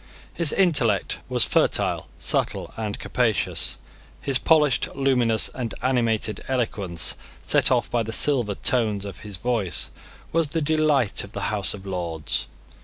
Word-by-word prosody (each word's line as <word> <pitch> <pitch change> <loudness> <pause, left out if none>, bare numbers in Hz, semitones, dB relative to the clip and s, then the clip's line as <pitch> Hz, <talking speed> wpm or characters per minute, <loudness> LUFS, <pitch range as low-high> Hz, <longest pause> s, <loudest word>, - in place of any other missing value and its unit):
His 165 -4 +1
intellect 135 - +2
was - - +2
fertile, - - +1
subtle, - - 0
and 110 -2 -4
capacious. 120 -4 0 0.4
His 135 -2 0
polished, 150 -5 +3
luminous, 125 -5 +3
and 120 -4 -4
animated 115 -5 0
eloquence, 100 -9 -1 0.3
set - - +4
off - - +1
by 120 - +1
the 110 0 -4
silver 120 -5 +2
tones 105 -5 +1
of 100 - -8
his 105 -3 -8
voice, 95 -8 0 0.4
was 165 -2 +2
the 165 - -1
delight 150 -6 +1
of 100 +2 -12
the - - -2
House 105 0 -1
of 100 -1 -12
Lords. 85 -6 -3
115 Hz, 140 wpm, -24 LUFS, 100-135 Hz, 0.4 s, set